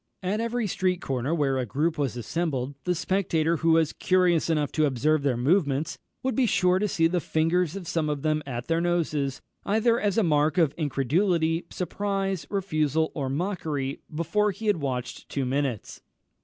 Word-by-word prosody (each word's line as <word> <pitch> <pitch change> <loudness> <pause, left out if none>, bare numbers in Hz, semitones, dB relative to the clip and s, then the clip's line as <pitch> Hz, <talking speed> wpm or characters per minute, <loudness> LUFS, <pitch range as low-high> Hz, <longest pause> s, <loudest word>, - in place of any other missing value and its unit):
At 200 +4 0
every 230 0 -1
street 185 -2 0
corner 130 -1 -2
where 135 -4 +1
a 125 - -1
group 155 +8 0
was 135 -6 -2
assembled, 135 +1 -2
the 180 0 +1
spectator 170 -2 +1
who 165 0 +3
was 160 -1 +3
curious 180 -3 +2
enough 150 -3 +1
to 155 -1 +2
observe 145 +4 +1
their 135 -4 +1
movements 145 +1 +1 0.2
would 260 0 0
be 260 -3 +3
sure 185 -4 +3
to 210 - +1
see 165 -4 +1
the 175 +2 +2
fingers 165 +2 +1
of 190 -4 -6
some 160 -2 0
of 145 -2 -3
them 155 -1 +1
at 120 -2 -4
their 165 0 +1
noses, 155 -6 -1 0.2
either 225 +3 +2
as 205 -1 0
a 225 - +4
mark 155 0 +2
of 160 -5 +3
incredulity, 165 - +1
surprise, 195 0 -2
refusal, 160 -6 0
or 135 -3 -3
mockery, 150 -4 -2
before 170 +7 +1
he 205 +3 -6
had 210 -3 +3
watched 130 -4 -4
two 135 -2 -2
minutes. 130 -4 -2
165 Hz, 180 wpm, -26 LUFS, 145-185 Hz, 0.2 s, a